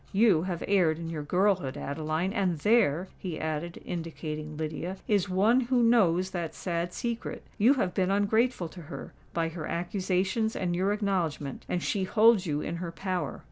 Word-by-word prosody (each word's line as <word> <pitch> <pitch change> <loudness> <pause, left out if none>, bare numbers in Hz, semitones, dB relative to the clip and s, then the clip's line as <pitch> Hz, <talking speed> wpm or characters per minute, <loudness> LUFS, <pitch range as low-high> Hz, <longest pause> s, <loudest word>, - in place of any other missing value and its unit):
You 200 -5 +5
have 175 -2 -3
erred 180 -6 +3
in 165 0 -5
your 155 -2 -3
girlhood, 180 -2 +1
Adeline! 155 +6 -2
and 190 -6 +1
there," 190 -2 +3
he 175 -5 -4
added, 160 +2 -3
indicating 155 -3 -5
Lydia, 160 +4 -4
"is 200 -3 +2
one 205 +7 +4
who 245 0 +2
knows 190 -6 +3
that 170 -3 -4
sad 170 -1 -2
secret. 235 +4 -4 0.2
You 240 +7 +6
have 185 -9 0
been 185 -1 +1
ungrateful 205 0 +2
to 180 - -10
her—by 165 +1 -5
her 165 -1 -6
accusations 190 +5 0
and 175 -2 -1
your 190 +3 +1
acknowledgment; 180 -9 -2
and 175 - -1
she 195 -2 0
holds 215 -1 +4
you 150 -1 -1
in 170 - -3
her 170 -1 -4
power. 185 +1 -3
180 Hz, 170 wpm, -29 LUFS, 165-200 Hz, 0.2 s, You